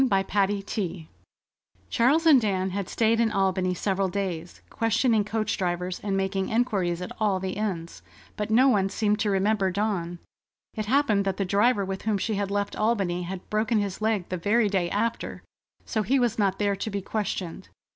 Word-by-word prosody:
CHAPTER 195 -1 0 0.3
XXVII 185 -5 -4 0.8
Charles 280 +8 +3
and 290 -6 +7
Dan 190 -3 0
had 195 -1 -3
stayed 225 0 +2
in 230 -2 +2
Albany 190 -2 +1
several 195 +1 0
days, 180 -3 -4
questioning 225 -1 +1
coach 215 +1 -2
drivers 180 0 -2
and 195 -2 -2
making 190 0 -1
enquiries 195 -7 0
at - - -7
all 205 -3 +1
the 190 0 -3
inns; 185 -5 -4 0.3
but 210 0 -3
no 245 +5 +5
one 195 -6 +3
seemed 210 +1 0
to 210 - +1
remember 195 0 +2
Dawn. 185 -3 -2 0.6
It 215 -2 -4
happened 250 -5 +3
that 195 -1 -1
the 195 - 0
driver 205 +2 +2
with 190 0 -4
whom 215 -2 0
she 215 +3 -2
had 200 -1 -1
left 200 0 -2
Albany 200 -5 0
had 180 +1 -6
broken 215 +1 +1
his 200 -1 -2
leg 215 -4 0
the 185 - -2
very 210 +5 +2
day 185 -3 0
after, 225 +5 -2 0.4
so 220 - -1
he 255 +7 +2
was 240 -3 +1
not 195 -2 +2
there 205 -1 +1
to 200 - -4
be 200 -2 -4
questioned. 195 -5 -4
200 Hz, 185 wpm, -26 LUFS, 190-220 Hz, 0.8 s, and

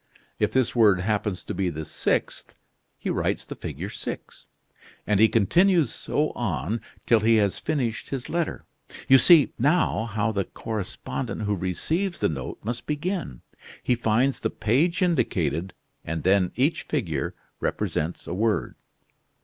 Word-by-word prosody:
If - - +2
this 130 -2 +1
word 105 -6 +5
happens 105 -1 -1
to - - -5
be 95 -2 0
the 80 -1 -5
sixth, 75 - -2 0.4
he - - -3
writes - - -1
the - - -6
figure - - -6
6, - - -7 0.6
and 105 -2 +2
he 110 - +7
continues 170 - +3
so 150 +1 -1
on 100 - -2 0.2
till 115 - +5
he 115 +2 +4
has 100 -3 +2
finished 130 -8 -2
his 135 -1 -4
letter. 170 0 -2 0.4
You 135 0 +8
see, 165 -2 +6
now, 145 -4 +2
how 110 0 -1
the 100 -2 -1
correspondent 100 - -5
who 105 0 0
receives 160 - -2
the - - +1
note 70 -5 -5
must 120 +2 -4
begin. 150 - -3 0.4
He - - +2
finds 120 +3 +1
the - - -1
page 165 - +1
indicated, 95 - 0 0.3
and 80 0 -4
then 95 -1 +3
each 150 +5 +1
figure 85 - -2 0.2
represents 80 +3 -2
a - - -5
word." 110 +3 0
110 Hz, 150 wpm, -25 LUFS, 95-140 Hz, 0.6 s, You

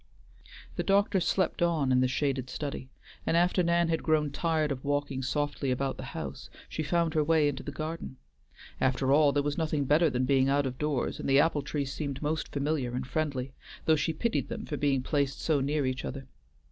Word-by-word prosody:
The - - 0
doctor 200 0 +3
slept 185 0 0
on 160 -6 +2
in 125 0 +4
the 130 - +3
shaded 130 -1 -1
study, 140 -1 -5 0.3
and 165 - +1
after 180 +2 +3
Nan 170 0 +2
had 160 - 0
grown 155 -2 +1
tired 155 0 0
of 130 -2 -4
walking 145 -2 -1
softly 145 +1 -1
about 135 +1 -1
the - - -6
house, - - -6 0.2
she - - -4
found 165 +1 +1
her 155 -2 +3
way 155 -1 +3
into 140 -2 -2
the 145 - -6
garden. 155 -1 -5 0.6
After 130 +1 +1
all, 145 0 +5
there 145 0 +1
was 145 +2 -2
nothing 155 -3 0
better 155 +4 +4
than 130 -1 0
being 135 0 +3
out 140 0 +2
of 130 -1 -4
doors, 150 -4 -1
and - - -3
the 135 +1 +6
apple 150 -1 +3
trees 140 -1 -3
seemed 140 -3 -4
most 155 +1 -2
familiar 140 -4 -1
and 130 0 -2
friendly, 135 -2 -2 0.3
though 160 - +5
she 155 +2 0
pitied 230 +9 -1
them - - -5
for 150 - -4
being 140 -3 +1
placed 140 -1 0
so 150 -4 +1
near 145 +1 0
each 130 0 -2
other. 135 0 -5
145 Hz, 210 wpm, -29 LUFS, 135-155 Hz, 0.6 s, the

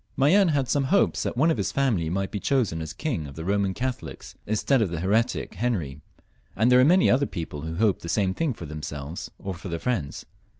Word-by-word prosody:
Mayenne 180 +8 +5
had 140 -5 +1
some 140 +1 +1
hopes 200 +9 +2
that - - -3
one 160 +6 +4
of - - 0
his - - -1
family 115 -13 +1
might 95 +2 -2
be 105 - -3
chosen 110 -10 0
as 80 - -5
king 120 - -3
by - - -7
the 80 - -7
Eoman 100 0 0
Catholics, 130 0 -5
instead 110 +5 +2
of 105 - +1
the 85 -1 -4
heretic 110 +7 0
Henry, 85 - -2 0.5
and 115 +3 +3
there 125 - +7
were 130 - +6
many 180 +5 +5
other 135 +2 +3
people 80 -5 -6
who 80 +1 -5
hoped 105 0 +1
the 85 - -7
same 95 +2 +1
thing 145 +1 -1
for 85 - -8
themselves 75 +1 -6
or 95 - -5
their 85 -1 -5
friends. 90 - -3
105 Hz, 220 wpm, -25 LUFS, 85-130 Hz, 0.5 s, there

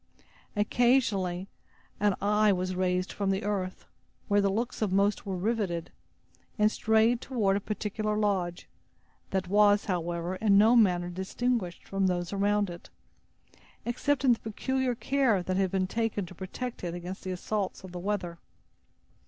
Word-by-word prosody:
Occasionally 205 -5 +2 0.5
an 205 -2 +2
eye 210 +1 +3
was 185 -1 -1
raised 180 0 0
from 200 -1 -1
the 195 0 0
earth, 195 -3 -3 0.4
where 205 0 +3
the 200 - +2
looks 225 +5 -2
of 210 -3 +1
most 200 +2 +1
were 190 - -2
riveted, 190 -4 -1 0.7
and 210 0 +4
strayed 220 +3 +2
toward 215 -7 +1
a - - +1
particular 210 +1 -2
lodge, 190 -5 -1 0.6
that 190 -1 -1
was, 205 +1 +4
however, 175 0 -2
in 205 -2 +4
no 220 +4 +6
manner 180 -6 +3
distinguished 190 +1 -2
from 195 -1 +1
those 175 0 -1
around 205 -1 +1
it, 170 - -11 1.0
except 270 +3 0
in 250 - +6
the 230 - -4
peculiar 260 +3 -1
care 250 -7 +1
that 185 +1 -2
had 190 -1 +2
been 190 0 0
taken 220 0 -1
to 175 - -11
protect 195 +7 -6
it 175 -1 -3
against 175 +2 -7
the 190 - -5
assaults 195 +2 -3
of 190 - -9
the 180 - -6
weather. 180 -3 -3
200 Hz, 155 wpm, -29 LUFS, 185-215 Hz, 1.0 s, no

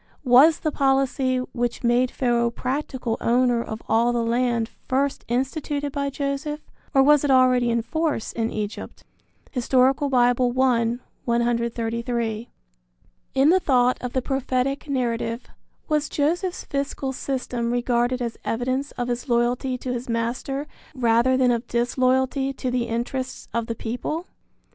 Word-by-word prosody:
Was 265 +6 +6
the 310 - 0
policy 270 -1 +1 0.2
which 240 0 -2
made 245 +1 +3
Pharaoh 240 -2 +1
practical 255 -1 -3
owner 245 0 +2
of 220 -1 -6
all 235 +2 +3
the 240 -1 0
land 235 -1 +1 0.2
first 275 +2 0
instituted 285 +3 -2
by 280 0 -1
Joseph, 280 +2 -3 0.3
or 270 - +5
was 295 +1 +5
it 290 - 0
already 255 -2 +4
in 230 -1 +1
force 315 -2 -1
in 225 -1 -1
Egypt? 210 -1 -5 0.5
(Hist. 250 -3 -4
Bible, 265 +2 +3 0.4
I, 235 -2 +2 0.3
133.) 235 -1 -1 0.9
In 270 +3 +5
the 375 - +5
thought 250 -6 +2
of 250 -1 -4
the 260 - 0
prophetic 270 +1 -1
narrative, 235 -3 -1 0.4
was 300 -1 0
Joseph's 350 +5 -1
fiscal 275 -1 -3
system 250 -3 -3
regarded 245 +1 +1
as 235 -1 -5
evidence 255 +4 -1
of 245 -1 -3
his 245 +2 -3
loyalty 245 +2 +1
to 250 0 -4
his 245 0 -5
master 240 +5 -2 0.3
rather 240 +1 +3
than 255 -1 +4
of 235 0 -1
disloyalty 260 +3 +1
to 255 -1 -3
the 245 -1 0
interests 245 +3 -3
of 230 -1 -1
the 230 - -3
people? 250 +10 -4
250 Hz, 140 wpm, -24 LUFS, 235-270 Hz, 0.9 s, Was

